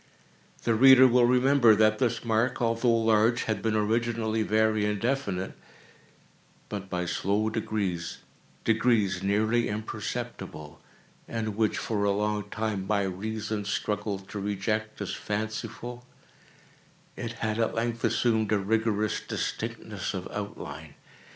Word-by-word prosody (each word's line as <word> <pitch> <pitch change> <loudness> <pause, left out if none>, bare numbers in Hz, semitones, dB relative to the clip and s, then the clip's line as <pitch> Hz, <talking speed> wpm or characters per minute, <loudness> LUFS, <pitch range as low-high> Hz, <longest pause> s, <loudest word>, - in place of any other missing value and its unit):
The 115 - +2
reader 130 +2 +8
will 125 -1 +4
remember 125 -2 +5
that 110 0 +3
this 120 -2 0
mark, 115 +2 +1
although 115 +1 +1
large, 115 0 +3
had 110 -3 -2
been 110 -1 0
originally 110 +1 0
very 110 0 +2
indefinite; 105 -2 -1 1.2
but, 100 -2 -5
by 90 -1 -2
slow 100 +5 0
degrees—degrees 105 +1 -1
nearly 110 +4 +1
imperceptible, 80 -6 -5 0.5
and 110 -2 -3
which 110 0 +1
for 110 -4 -1
a 100 - +3
long 105 0 -1
time 105 -3 -2
my 100 -1 +2
reason 105 +3 -3
struggled 100 -1 -2
to 105 - -5
reject 105 +2 -2
as 100 - -3
fanciful—it 115 +2 -7
had, 110 -1 -2
at 115 - 0
length, 115 0 -2
assumed 110 -3 +2
a 105 - +4
rigorous 110 +1 0
distinctness - - -4
of - - -4
outline. - - -7
110 Hz, 120 wpm, -28 LUFS, 105-115 Hz, 1.2 s, reader